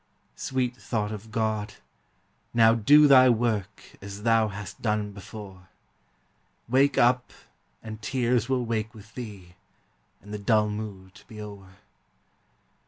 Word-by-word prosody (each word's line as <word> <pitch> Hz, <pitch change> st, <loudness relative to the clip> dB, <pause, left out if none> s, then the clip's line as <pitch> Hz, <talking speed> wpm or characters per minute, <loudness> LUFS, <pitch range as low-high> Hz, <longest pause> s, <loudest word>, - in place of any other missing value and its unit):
Sweet 125 Hz, -2 st, -2 dB
thought 110 Hz, -4 st, -3 dB
of 110 Hz, +1 st, -8 dB
God! 110 Hz, -1 st, -2 dB, 0.8 s
now 115 Hz, -1 st, +6 dB
do 145 Hz, +7 st, +6 dB
thy 130 Hz, -2 st, +7 dB
work 110 Hz, -4 st, -1 dB, 0.2 s
As 100 Hz, +1 st, -8 dB
thou 115 Hz, -1 st, +3 dB
hast 105 Hz, -1 st, -8 dB
done 105 Hz, -2 st, -1 dB
before; 100 Hz, -2 st, -11 dB, 1.0 s
Wake 135 Hz, +3 st, +3 dB
up, 125 Hz, +1 st, +3 dB, 0.5 s
and 110 Hz, -1 st, -8 dB
tears 125 Hz, 0 st, 0 dB
will 130 Hz, -2 st, 0 dB
wake 115 Hz, 0 st, -3 dB
with 110 Hz, +1 st, -14 dB
thee, 100 Hz, -8 st, -9 dB, 0.7 s
And 105 Hz, +1 st, -11 dB
the 105 Hz, -, -4 dB
dull 105 Hz, +1 st, +2 dB
mood 105 Hz, -2 st, -7 dB
be 110 Hz, -, -11 dB
o'er. 100 Hz, -3 st, -10 dB
110 Hz, 125 wpm, -26 LUFS, 105-120 Hz, 1.0 s, thy